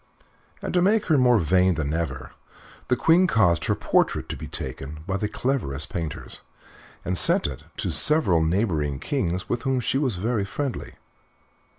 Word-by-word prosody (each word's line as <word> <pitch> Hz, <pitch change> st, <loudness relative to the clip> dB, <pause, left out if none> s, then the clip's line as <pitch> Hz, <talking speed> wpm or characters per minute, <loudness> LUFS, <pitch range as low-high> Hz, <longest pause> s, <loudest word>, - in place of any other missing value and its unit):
And -, -, -3 dB
to 180 Hz, -, +3 dB
make 210 Hz, +4 st, +3 dB
her 155 Hz, -, +5 dB
more 125 Hz, -2 st, +5 dB
vain 90 Hz, +1 st, +3 dB
than 75 Hz, -2 st, -2 dB
ever 65 Hz, -6 st, -3 dB, 0.6 s
the 125 Hz, -, +3 dB
Queen 165 Hz, +8 st, +4 dB
caused 90 Hz, -, +3 dB
her -, -, +1 dB
portrait -, -, +1 dB
to -, -, -3 dB
be -, -, -7 dB
taken 75 Hz, +3 st, -6 dB
by 95 Hz, 0 st, -1 dB
the 105 Hz, -, -1 dB
cleverest 80 Hz, -, -2 dB
painters 80 Hz, -3 st, -5 dB, 0.6 s
and 90 Hz, -, -1 dB
sent -, -, +2 dB
it 70 Hz, -3 st, -4 dB
to -, -, -2 dB
several 95 Hz, -, +2 dB
neighboring 80 Hz, -5 st, 0 dB
kings 90 Hz, -, -2 dB
with 120 Hz, -, -1 dB
whom 135 Hz, -2 st, 0 dB
she 125 Hz, +3 st, 0 dB
was 130 Hz, -8 st, 0 dB
very 110 Hz, +3 st, -1 dB
friendly. 135 Hz, +6 st, -4 dB
95 Hz, 170 wpm, -25 LUFS, 80-130 Hz, 0.6 s, her